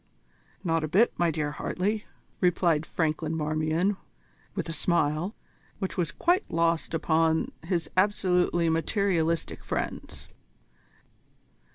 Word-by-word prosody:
"Not 165 -3 +1
a - - 0
bit, 205 +10 +4
my 175 -1 +3
dear 155 -2 -1
Hartley," 205 +7 -2 0.3
replied 170 -3 +2
Franklin 160 0 -1
Marmion 155 +5 0 0.6
with - - -2
a 165 - -3
smile, 165 +4 +1 0.4
which 190 -2 -3
was 175 -4 0
quite 360 +4 +1
lost 165 0 +1
upon 160 0 +2
his 170 -1 -1
absolutely 180 -3 +2
materialistic 165 0 0
friends. - - -4
165 Hz, 105 wpm, -28 LUFS, 160-185 Hz, 0.6 s, bit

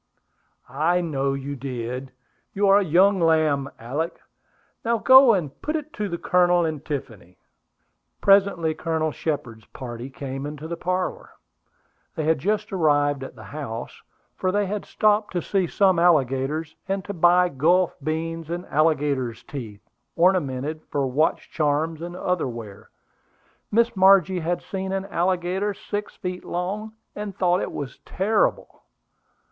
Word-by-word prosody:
"I 155 +7 +1
know 140 -5 -1
you 140 +1 -5
did. 125 0 -5 0.4
You 200 +1 +2
are 200 +1 +7
a - - +1
young 190 +4 +4
lamb, 155 -4 +2
Alick. 145 +9 -3 0.6
Now 235 0 +1
go 260 0 +7
and 155 -7 -4
put 305 - -2
it 310 0 -5
to 210 -5 -3
the 170 - -3
Colonel 175 0 +3
and 155 -3 -3
Tiffany." 110 - -6 0.8
Presently 195 -5 +4
Colonel 160 -1 -1
Shepard's 125 -9 -4
party 120 0 -7
came 135 0 -6
into 150 +1 -7
the 170 - -4
parlor. 180 +2 -2 0.9
They 160 - -2
had 160 -1 +2
just 210 +5 -1
arrived 145 -5 +2
at - - -9
the - - -12
house, 120 -6 -7 0.3
for 185 - 0
they 205 +1 +1
had 205 +1 -4
stopped 210 0 +1
to 175 - 0
see 190 -3 0
some 190 -1 +3
alligators, 150 -1 +1
and 195 -1 -2
to 200 - -5
buy 180 +1 +4
Gulf 170 +5 +2
beans 165 +2 -3
and 175 +2 -4
alligator's 145 -6 +1
teeth, 115 -8 -8 0.3
ornamented, 155 -4 +1
for 140 -1 0
watch 140 +5 0
charms 155 +1 0
and 175 +1 -6
other 180 -4 -1
wear. 115 -5 -9 0.8
Miss 235 +1 +2
Margie 190 -1 +5
had 175 +1 -2
seen 190 0 -4
an 195 0 -2
alligator 185 +2 -1
six 205 +1 -5
feet 180 -1 -5
long, 200 +5 -4 0.2
and 205 -2 -6
thought 180 -1 +2
he - - -2
was 140 -3 -6
very - - -17
terrible. 205 +3 +1
165 Hz, 150 wpm, -24 LUFS, 140-190 Hz, 0.9 s, are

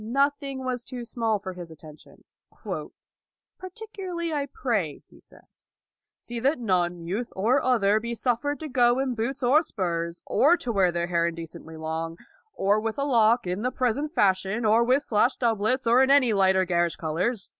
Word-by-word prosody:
Nothing 275 +2 -1
was 250 -1 -2
too 245 -2 -7
small 225 -2 -1
for 190 -2 -7
his 175 -2 -9
attention. 155 -1 -15 0.7
" - - -66
Particularly 370 -4 -6
I 285 -2 -1
pray," 215 - -2
he - - -20
says, - - -22 0.3
" - - -65
see 240 0 -6
that 275 +6 +1
none, 180 -6 -1
youth 210 +8 -3
or 230 +8 +2
other, 215 -5 +3
be 235 +1 -4
suffered 250 +5 -1
to 315 - -4
go 245 -2 +3
in 265 -1 0
boots 245 +4 -3
or 270 +6 +5
spurs, 170 - -3
or 335 +5 +4
to 245 - -4
wear 190 -4 +3
their 170 0 -1
hair 170 -1 +1
indecently 165 -1 -8
long, 160 +1 -4 0.4
or 200 +2 +2
with 225 0 -3
a 280 - 0
lock 235 -4 +3
in 180 +3 -2
the 250 - 0
present 255 +4 -1
fashion, 195 - +1
or 220 +2 +4
with 260 +4 +2
slashed 235 +3 +1
doublets, 230 +2 +1
or 235 +3 +5
in 265 - +3
any 275 -5 +5
light 190 -1 +3
or 190 0 +2
garish 175 -1 0
colors." 185 +7 -2
230 Hz, 185 wpm, -26 LUFS, 185-260 Hz, 0.7 s, or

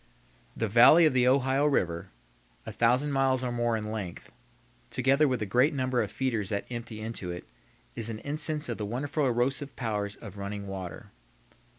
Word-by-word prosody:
The 115 - 0
valley 120 +10 +7
of 155 - +3
the 125 -1 +3
Ohio 135 +2 +3
River, 85 - 0 0.6
a - - -5
thousand 125 +5 +2
miles 135 -1 +2
or 125 - -1
more 120 -1 0
in 105 0 -5
length, 100 -6 -6 0.6
together 135 +4 +3
with 125 -4 -1
the - - 0
great 125 +9 +2
number 130 -2 0
of 105 - -3
feeders 115 -6 -1
that 100 -1 -2
empty 115 -2 -6
into 110 -5 -5
it, 90 0 -7 0.5
is 115 - -3
an 110 - -4
instance 150 +4 -1
of 120 -2 -4
the 105 - -2
wonderful 140 +5 -1
erosive 130 +3 0
power 105 -4 -2
of 100 -2 -10
running 100 0 -5
water. 95 -4 -7
120 Hz, 180 wpm, -28 LUFS, 105-135 Hz, 0.6 s, valley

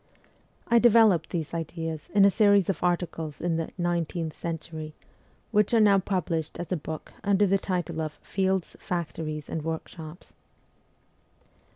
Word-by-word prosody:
I 235 - +5
developed 220 -8 +5
these 165 -4 -3
ideas 165 -1 -4
in 200 -1 +7
a 200 - +6
series 200 -2 +4
of - - -8
articles 170 -4 -1
in 170 -1 0
the 165 - -2
' - - -38
Nineteenth 170 -1 -2
Century,' 160 -1 -6 0.6
which 210 +1 +3
are - - +6
now 200 -2 +6
published 170 -5 -2
as 175 - -6
a - - +2
book 155 -1 -7
under 200 0 +3
the 195 0 +2
title 175 -4 -2
of 155 -1 -3
' - - -30
Fields, 190 -2 0
Factories, 155 -3 -4
and 160 - -3
Workshops.' 160 +1 -6
170 Hz, 155 wpm, -27 LUFS, 160-195 Hz, 0.6 s, in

